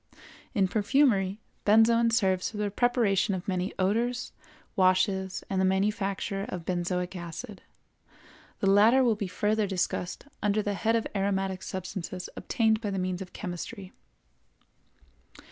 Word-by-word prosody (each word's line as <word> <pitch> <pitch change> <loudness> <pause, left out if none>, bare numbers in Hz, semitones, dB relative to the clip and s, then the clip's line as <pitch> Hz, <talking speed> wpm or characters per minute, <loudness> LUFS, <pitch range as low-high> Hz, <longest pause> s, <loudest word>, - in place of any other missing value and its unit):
In 195 -2 +3
perfumery, 205 -2 +2 0.2
benzoin 230 +2 +5
serves 190 -5 +1
for 215 - -9
the 210 -1 -1
preparation 210 -4 +2
of 180 - -6
many 185 0 -1
odors, 235 +6 0 0.4
washes, 190 0 +2
and 190 -1 0
the - - +3
manufacture 195 0 0
of 175 -3 -5
benzoic 180 +1 -2
acid. 180 +5 -7 1.0
The 195 - +2
latter 225 +6 +6
will 235 -3 +4
be 205 -2 -3
further 210 +3 0
discussed 180 0 -2 0.2
under 210 +1 +1
the 205 - -1
head 225 +3 +1
of 230 - 0
aromatic 195 -1 -1
substances 185 -1 -5
obtained 220 -2 +1
by 210 - -2
means 185 -2 -2
of 185 - -8
chemistry. 190 +1 -6
195 Hz, 130 wpm, -28 LUFS, 185-220 Hz, 1.0 s, latter